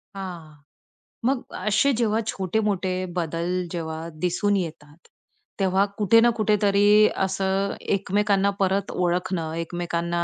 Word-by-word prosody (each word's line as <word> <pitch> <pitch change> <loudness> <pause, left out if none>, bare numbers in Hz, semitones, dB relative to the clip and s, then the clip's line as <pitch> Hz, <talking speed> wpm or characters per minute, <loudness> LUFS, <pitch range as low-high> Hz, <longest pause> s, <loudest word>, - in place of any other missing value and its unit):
हां, 175 -5 -7 0.7
मग 265 -1 +1
असे 215 +8 +2
जेव्हा 225 -2 +1
छोटे-मोठे 195 -1 -1 0.2
बदल 170 0 -2 0.2
जेव्हा 160 -1 -4
दिसून 180 +4 +1
येतात, 160 -4 -6 0.6
तेव्हा 190 0 +3
कुठे 215 +1 +5
ना 240 - +5
कुठेतरी 210 0 +4 0.2
असं 195 +1 -1 0.2
एकमेकांना 200 0 +1
परत 195 0 0
ओळखणं, 180 -2 -1
एकमेकांना 170 +1 -2
190 Hz, 105 wpm, -24 LUFS, 170-205 Hz, 0.7 s, कुठे